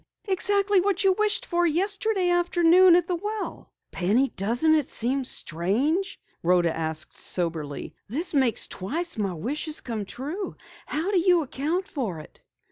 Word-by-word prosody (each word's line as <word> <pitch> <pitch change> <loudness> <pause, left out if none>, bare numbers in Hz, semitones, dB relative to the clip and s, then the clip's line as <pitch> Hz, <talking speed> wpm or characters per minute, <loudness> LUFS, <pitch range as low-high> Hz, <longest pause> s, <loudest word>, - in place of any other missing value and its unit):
Exactly 400 0 +3
what 395 0 0
you 385 -1 +5
wished 425 +1 0
for 350 -1 0
yesterday 390 +2 +1
afternoon 350 0 +5
at 350 -1 +2
the 360 - -1
well." 420 +3 -5 0.2
"Penny, 220 +9 +1
doesn't 240 +11 +1
it 305 -4 +1
seem 260 +4 -1
strange?" 255 - 0 0.2
Rhoda 175 -1 +2
asked 160 -1 -3
soberly. 160 -5 -2
"This 325 - -2
makes 260 -6 +2
twice 300 - -3
my 195 -4 -1
wish 255 - -3
has 310 -1 -2
come 220 -4 -5
true. 300 - -6 0.3
How 325 +7 -2
do 380 - +3
you 350 -2 +3
account 310 +8 -2
for 245 - -4
it?" 155 - -14
315 Hz, 150 wpm, -25 LUFS, -, 0.3 s, you